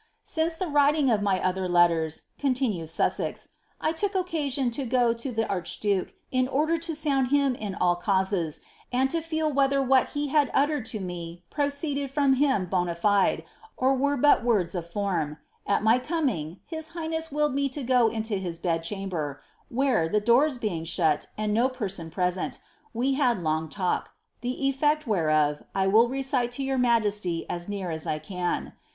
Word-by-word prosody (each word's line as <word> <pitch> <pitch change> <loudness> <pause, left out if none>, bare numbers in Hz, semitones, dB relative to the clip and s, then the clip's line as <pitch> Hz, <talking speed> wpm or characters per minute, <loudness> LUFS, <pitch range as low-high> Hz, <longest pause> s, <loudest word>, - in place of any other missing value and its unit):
" - - -44
Since 325 +1 0
the 370 - -1
writing 290 -2 +3
of 215 -2 +2
my 195 -2 +1
other 185 0 -1
leiiera," 170 -3 +2 0.2
oontinues 250 - 0
Susaei, 165 - 0
■■ - - -10 0.3
I - - +1
look 320 - -3 0.2
occwiaa 295 -9 -1
B 265 -3 -3
fO 245 -2 +3
10 235 +1 -5
the 225 0 +1
arebduke 195 +1 -1 0.2
in 255 0 +2
order 300 +5 +1
lo 335 - +1
saund 300 -5 0
him 280 0 +2
in 210 -5 -5
all 175 -1 +2
cauiies, 190 -5 0 0.3
and 260 +2 +1
lo 335 - 0
feel 315 -2 -1
whether 275 0 +3
what 265 -1 +3
he 290 -1 -1
had 290 -1 +3
tillered 285 -4 +1
10 210 -4 -4
me 175 -1 -7
proceeded 285 -1 -1
from 275 -1 +3
him 265 -7 +2
bonafidiy 180 +2 +1 0.3
or 260 +1 +3
were 285 +2 +1
but 290 -1 +4
words 205 -8 +1
of 170 -2 -5
Ibmi. 170 -7 -1 0.3
A< 200 - +3
my 225 +3 +4
coming, 250 - -2
bis 320 -1 -4
highness 320 -1 -4
willed 295 -1 +1
me 280 0 +1
10 270 0 -5
go 250 -2 +4
into 220 -2 -2
his 175 -3 -4
bed 165 -1 -1
cliamber, 165 -6 -4 0.3
wbeie, 250 -10 +1
the 210 - +3
doors 250 +6 +3
being 200 -9 -2
shut 160 -2 +1
and 210 0 -1
no 240 +4 +3
per^n 195 -10 -4
present, 180 +1 -1 0.3
we 255 +3 0
had 250 - +1
long 160 0 -1
talk, 180 +1 -1 0.3
die 250 +1 -2
elfect 295 +3 +1
wbereof 155 - +1
I 190 -1 +2
will 220 +5 +5
cecile 265 -2 0
to 275 - -3
yom 270 -1 0
majesty 210 -8 +1
as 175 +2 -4
near 195 -4 -3
as 160 -1 -4
1 155 0 -2
can. 180 +2 -3
235 Hz, 180 wpm, -26 LUFS, 180-275 Hz, 0.3 s, will